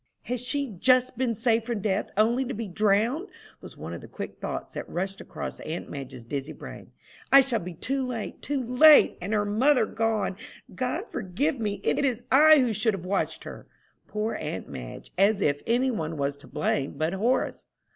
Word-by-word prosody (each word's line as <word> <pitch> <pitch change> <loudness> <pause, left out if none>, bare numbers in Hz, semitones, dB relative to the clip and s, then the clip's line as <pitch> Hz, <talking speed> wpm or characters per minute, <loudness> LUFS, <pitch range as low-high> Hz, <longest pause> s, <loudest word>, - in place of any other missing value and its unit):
"Has 245 -1 -3
she 280 +3 0
just 255 +2 +4
been 240 -1 0
saved 225 0 +1
from 235 -4 -2
death 195 0 0
only 235 +5 +3
to 260 - -4
be 225 0 -4
drowned?" 215 - +1 0.3
was - - -11
one - - -7
of - - -7
the - - -11
quick - - -7
thoughts - - -5
that - - -6
rushed 190 +2 -3
across - - -6
aunt 160 +2 -6
Madge's 135 -4 -7
dizzy 140 +5 -5
brain. - - -10 0.4
"I 275 - +10
shall 250 -4 0
be 180 -2 -7
too 265 +8 -2
late! 235 -4 -5
too 280 -2 -2
late! 270 +6 +6
And 190 +4 -4
her 210 -1 +1
mother 240 +4 +3
gone! 220 -4 -1 0.4
God 255 - -2
forgive 250 - -2
me! 210 -2 -2
It - - +1
is 250 -3 0
I 305 +2 +8
who 240 -3 +1
should 215 0 +1
have 180 -2 -8
watched 195 +2 -1
her!" - - -10 0.4
Poor 215 +1 -2
aunt 150 - -5
Madge! - - -9
as 200 +1 +4
if 145 -6 +1
any 250 +3 +2
one 160 -7 -3
was 140 0 -1
to 140 - -14
blame 140 0 -1
but 160 +3 0
Horace. 235 +7 0
220 Hz, 195 wpm, -27 LUFS, 190-255 Hz, 0.4 s, I